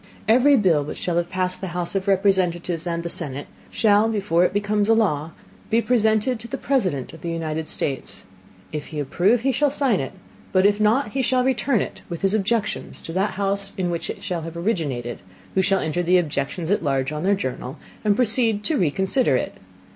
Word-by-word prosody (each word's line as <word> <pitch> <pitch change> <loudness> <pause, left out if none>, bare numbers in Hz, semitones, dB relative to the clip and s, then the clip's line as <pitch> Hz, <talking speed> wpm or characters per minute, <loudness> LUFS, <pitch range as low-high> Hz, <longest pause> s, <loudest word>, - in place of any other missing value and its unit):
Every 255 +5 +5
Bill 175 - +3
which 145 - -6
shall 175 -1 -1
have 175 0 0
passed 185 0 -2
the 180 -2 -4
House 175 -1 -2
of 195 0 -2
Representatives 180 -3 +1
and 170 0 -2
the - - -3
Senate, 145 -4 -4 0.2
shall, 215 0 +3
before 195 -5 +2
it 180 - +2
become 205 +1 0
a 225 - +4
Law, 165 -9 +1 0.4
be 225 +1 +3
presented 220 0 +2
to 230 - -8
the 270 - -4
President 185 - -1
of 160 - -12
the 170 - -4
United 160 -1 -3
States; 135 -3 -4 0.5
If 150 -1 -5
he 155 - -5
approve 180 - +2
he 270 +2 +2
shall 285 +3 +2
sign 270 -7 +1
it, 135 - -4 0.4
but 185 0 +3
if 205 +1 +3
not 215 +4 +3
he 265 +5 -1
shall 255 0 +2
return 260 -3 +1
it, - - -5
with 170 0 -6
his 195 +1 +2
Objections 220 +1 -1
to 165 - -7
that 195 +3 0
House 200 0 -2
in 180 -2 0
which 170 - -3
it - - -6
shall 175 -2 -2
have 165 +1 -7
originated, 145 - -2 0.3
who 190 - +3
shall 195 +1 +2
enter 160 +3 -1
the 180 +1 +4
Objections 160 +1 -2
at 205 - +2
large 135 -2 0
on 150 0 -4
their 200 +3 +3
Journal, 130 -6 -5 0.3
and 210 -2 +3
proceed 225 -2 +2
to 305 +6 +1
reconsider 190 - +2
it. - - -2
190 Hz, 205 wpm, -23 LUFS, 165-220 Hz, 0.5 s, Every